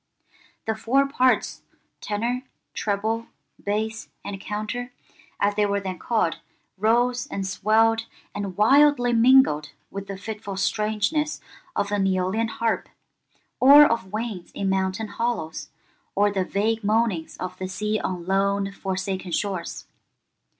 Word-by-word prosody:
The 220 - 0
four 255 +6 +2
parts, 255 -2 +1 0.4
tenor, 235 +4 -2 0.3
treble, 220 +3 -1 0.4
bass, 220 +2 -2 0.2
and 195 -1 -5
counter, 215 +5 -4 0.5
as 205 +1 +2
they 205 0 +2
were 200 0 0
then 190 -2 -5
called, 220 -8 0 0.4
rose 240 +4 +2
and 195 - -4
swelled 225 +4 +2 0.3
and 195 -3 -5
wildly 260 +2 +5
mingled 230 - +5 0.2
with 195 0 -6
the 195 - -5
fitful 205 -1 -6
strangeness 215 +10 0 0.4
of 200 - -1
an 205 -2 +1
Æolian 190 +4 0
harp, 230 0 -1 0.7
or 285 +3 +9
of 210 -8 -1
winds 215 -5 -4
in 195 -1 -1
mountain 190 +3 -1
hollows, 225 -11 -3 0.5
or 205 +1 +3
the 190 -2 0
vague 220 +3 0
moanings 210 -6 0
of 185 0 -6
the 185 - -3
sea 210 +3 -1
on 180 -2 -4
lone, 195 +1 +1
forsaken 190 -1 -3
shores. 190 -1 -3
210 Hz, 130 wpm, -24 LUFS, 195-230 Hz, 0.7 s, or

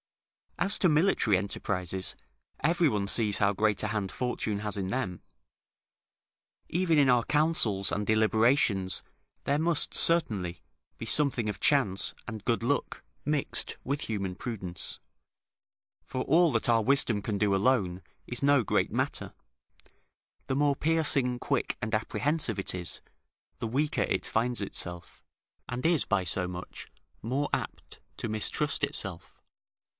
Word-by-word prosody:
As 200 +2 +2
to 185 - +4
military 150 - +3
enterprises, 95 -1 -3 0.5
every 170 +2 +3
one 105 -4 -1
sees 105 -1 +3
how 100 -1 +2
great 105 +1 +1
a 105 - -1
hand 105 -3 -2
Fortune 110 -4 -2
has 105 0 -4
in 95 -2 -2
them. 95 -5 -3 1.5
Even 170 -2 +1
in 140 -2 +4
our 125 -2 +4
counsels 145 -11 +2
and 105 0 -1
deliberations 110 -3 +3 0.4
there 140 - +1
must, 165 -1 +1
certainly, 100 - +1 0.4
be - - -6
something 130 -7 +2
of 105 - -5
chance 115 -10 +2
and 110 -3 -7
good 115 -1 +1
luck 140 +5 -2 0.2
mixed 150 -2 0
with 140 +2 -2
human 100 -4 -3
prudence; 95 -6 -5 1.0
for 130 - -4
all 165 +2 +4
that - - +1
our 115 -1 +4
wisdom 120 -5 +2
can 105 -3 -2
do 100 -1 +2
alone 95 -4 +1 0.3
is 120 +2 -3
no 140 -3 +4
great - - 0
matter; - - -2 1.1
the 130 - -2
more 145 0 +2
piercing, 140 -6 +2
quick, - - -1
and 110 0 -1
apprehensive 115 +2 0
it 95 - 0
is, 90 -3 -1 0.6
the 115 - -3
weaker 145 +6 0
it - - -1
finds 120 +1 0
itself, 90 -3 -5 0.5
and 125 +3 -4
is 165 -3 +3
by 100 -3 +1
so 90 +1 +1
much 90 0 -8 0.4
more 135 +6 -1
apt - - -4 0.2
to 115 - -4
mistrust 110 0 0
itself. - - -2
115 Hz, 140 wpm, -29 LUFS, 100-140 Hz, 1.5 s, to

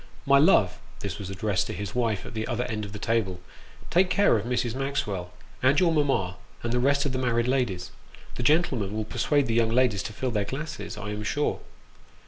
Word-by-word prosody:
" - - -24
My - - +7
love 150 - +4 0.2
(this - - -4
was 95 - -6
addressed 100 +1 -1
to - - -4
his 100 -2 -5
wife 115 -5 0
at - - -8
the 110 0 -3
other 120 +1 -1
end 105 -3 -3
of 100 - -9
the 105 - -6
table), 105 -4 0 0.5
take 180 +2 +4
care 200 -10 +4
of 110 +1 -1
Mrs. 125 -2 0
Maxwell, 105 -10 -2 0.3
and 135 +3 +4
your 175 -2 +4
mamma, 135 - +1 0.3
and 120 0 -1
the 125 - +2
rest 140 +3 +2
of 140 - 0
the 130 - -2
married 120 -2 +1
ladies; 125 -9 0 0.4
the - - -5
gentlemen 125 - +2
will 110 0 -2
persuade 135 +6 +1
the 115 - -1
young 115 -1 +3
ladies 115 -4 +2
to - - -5
fill 130 +4 -2
their 105 -3 0
glasses, 140 +4 -5
I 105 0 -5
am 105 0 -4
sure." 145 +7 -1
120 Hz, 220 wpm, -26 LUFS, 105-135 Hz, 0.5 s, My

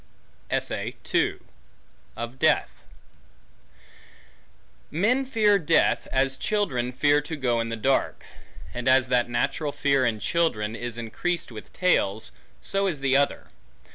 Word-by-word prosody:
Of 120 - -4
Death - - +3 2.2
MEN 230 - +1
fear 210 -5 +3
death, 165 -1 +2
as 135 0 +1
children 135 - -1
fear 145 +3 +3
to 150 +2 -5
go 125 -5 0
in 115 - -3
the 115 - -2
dark; 130 +5 0 0.5
and 125 +1 -4
as 130 -1 +4
that 125 -1 +2
natural 130 +5 -1
fear 140 -2 +1
in 115 -3 0
children, 110 -6 0
is 120 0 -5
increased 125 +9 -3
with 110 -2 -10
tales, 110 - +1 0.3
so 195 0 +1
is 155 -7 -3
the 135 -1 +2
other. 140 +1 +1
135 Hz, 120 wpm, -25 LUFS, 120-165 Hz, 2.2 s, as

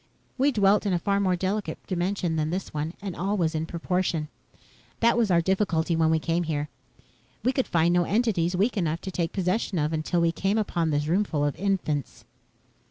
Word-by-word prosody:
We 275 +2 +3
dwelt 205 -2 +3
in 195 - +1
a - - +3
far 200 +3 0
more 185 -2 +2
delicate 195 +3 -2
dimension 180 -2 -1
than 155 -1 0
this 185 +3 -4
one 155 +3 -3
and 195 -3 -4
all 200 +4 -1
was 165 -3 +1
in 160 0 -2
proportion. 170 -3 -1 0.7
That 235 0 +4
was 235 -3 +2
our 170 -2 +4
difficulty 175 -3 +1
when 160 -1 +3
we 160 - +3
came 165 +2 0
here. 150 -3 -2 0.7
We 250 - +3
could 265 - 0
find 170 +1 +2
no 175 -1 +3
entities 195 -6 +1
weak 210 +5 +1
enough 165 -3 -1
to 190 - -5
take 170 -2 -1
possession 190 +1 -1
of 155 0 0
until 160 +3 0
we 170 0 +3
came 195 +5 0
upon 170 -6 0
this 145 -1 0
roomful 165 -3 +1
of 145 - -1
infants." 180 -8 -2
175 Hz, 200 wpm, -26 LUFS, 160-200 Hz, 0.7 s, That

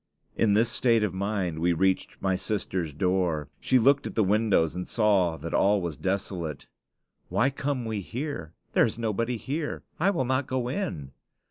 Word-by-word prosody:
In 105 -3 +3
this 115 +2 +3
state 115 -2 +3
of 100 -4 0
mind 95 -4 -2
we 85 +1 +2
reached 95 +3 0
my 95 -1 +1
sister's 95 -4 -2
door. 85 -2 0
She 130 - +3
looked 135 +4 +4
at - - -8
the 110 - +3
windows 100 -5 +2
and 90 0 -4
saw 100 -7 +2
that 85 - -6
all 100 +1 +4
was 85 -4 -3
desolate. 90 -5 -3 0.6
"Why 130 +4 +2
come 135 -2 -2
we 110 -2 -2
here? 120 - -5 0.2
There - - +5
is 110 - -5
nobody 115 +1 -1
here. 150 +6 -4 0.2
I 180 +5 +3
will 135 -10 0
not 130 +1 0
go 125 -1 -1
in." 125 - -3
105 Hz, 175 wpm, -27 LUFS, 90-120 Hz, 0.6 s, There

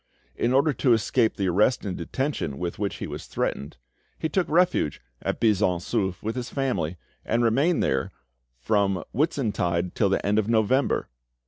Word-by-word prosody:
In 120 - 0
order 140 +3 +3
to 125 0 +3
escape 115 +1 +2
the 95 - 0
arrest 105 +8 +2
and 95 -3 -3
detention 85 - -3
with 90 0 -4
which 100 -2 -1
he - - -5
was - - -7
threatened, 70 0 -3 0.4
he 160 - -2
took 180 +3 0
refuge 175 - +2 0.2
at - - -2
Buisson 105 -5 +3
Souef 95 0 -2
with 110 +2 -2
his 125 -1 -4
family, 95 - -1 0.3
and 115 +2 +1
remained 140 +10 +2
there 65 -1 0 0.5
from 100 - +1
Whitsuntide 105 - 0
till 100 - +2
the 95 - 0
end 105 +2 +3
of 110 +1 -1
November. 115 +4 +2
110 Hz, 165 wpm, -25 LUFS, 90-130 Hz, 0.5 s, order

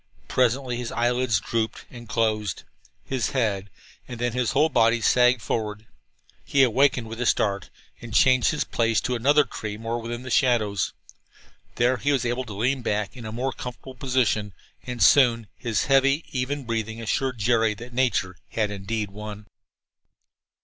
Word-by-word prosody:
Presently 125 0 +1
his 120 -1 -4
lids 120 -2 +1
drooped 110 +2 -3
and 120 -2 -11
closed. 110 -4 -1 0.4
His 130 -4 -1
head, 100 -5 0 0.4
and 125 -2 -8
then 120 0 0
his 125 -2 0
whole 150 +4 +3
body, 115 -3 +3
sagged 125 0 +3
forward. 105 -1 -3 0.6
He 135 -1 +4
wakened 130 0 +2
with 115 +2 -6
a 125 - +1
start 100 -2 +1 0.3
and 120 - -9
changed 130 +2 +4
his 150 - 0
place 115 -1 +1
to 125 - -2
another 145 +5 +4
tree 105 -5 -6
more 115 +1 -3
within 120 +2 -5
the 130 - -7
shadows. 110 -7 +2 0.8
There 125 +2 +2
he 140 +5 0
was 135 -3 +1
able 120 +2 -1
to 110 - -8
lean 130 +5 0
back 105 0 -2
in 120 -3 -8
a - - -6
more 130 +4 -2
comfortable 125 +1 -8
position, 125 -6 0 0.3
and 125 -1 -1
soon 120 -5 +5
his 115 -4 -1
heavy, 135 +3 +3
even 135 +2 -2
breathing 115 -1 -3
assured 125 +3 -1
Jerry 110 0 +2
that 120 +3 -11
nature 100 -8 0
had, 105 -2 -1
indeed, 105 +1 -3
won. 105 0 -8
120 Hz, 165 wpm, -25 LUFS, 110-130 Hz, 0.8 s, soon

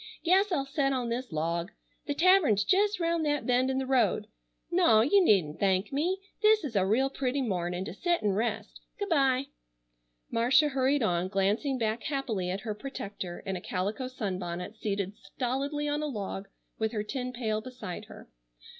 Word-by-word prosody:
Guess 380 +4 +3
I'll 275 -6 0
set 275 0 0
on 250 -2 -1
this 245 0 -3
log. 170 +4 -2 0.4
The 290 - -1
tavern's 330 - +5
jest 405 - +2
round 335 -1 +1
that 295 -1 0
bend 255 +1 +2
in 265 - 0
the 265 - -1
road. 240 -6 +2 0.5
Naw, 345 -12 +5
you 370 - +5
needn't 175 - +3
thank 195 +3 +1
me. 340 +7 +1 0.2
This 430 0 +5
is 265 -7 -5
a 190 -1 +3
real 245 +7 +3
pretty 270 0 -1
mornin' 180 -4 -2
to - - -6
set 345 - 0
an' 205 - +2
rest. 220 +3 -2 0.2
Good 405 0 -3
bye." 270 -4 +3 0.9
Marcia 250 +6 +4
hurried 270 0 +1
on, 180 -3 +1
glancing 205 +8 0
back 225 -1 -1
happily 230 -10 -2
at 190 +2 -3
her 220 -3 -3
protector 205 -7 -6
in 195 -1 -2
a 180 - -5
calico 205 +9 -2
sunbonnet 185 -5 -4
seated 200 -3 -2
stolidly 270 +8 -3
on 295 +1 -1
a 305 - -1
log 200 -6 -5 0.3
with 220 +1 0
her 210 -2 -1
tin 250 +3 -4
pail 220 -3 -2
beside 250 -7 -7
her. - - -13
245 Hz, 180 wpm, -29 LUFS, 200-280 Hz, 0.9 s, tavern's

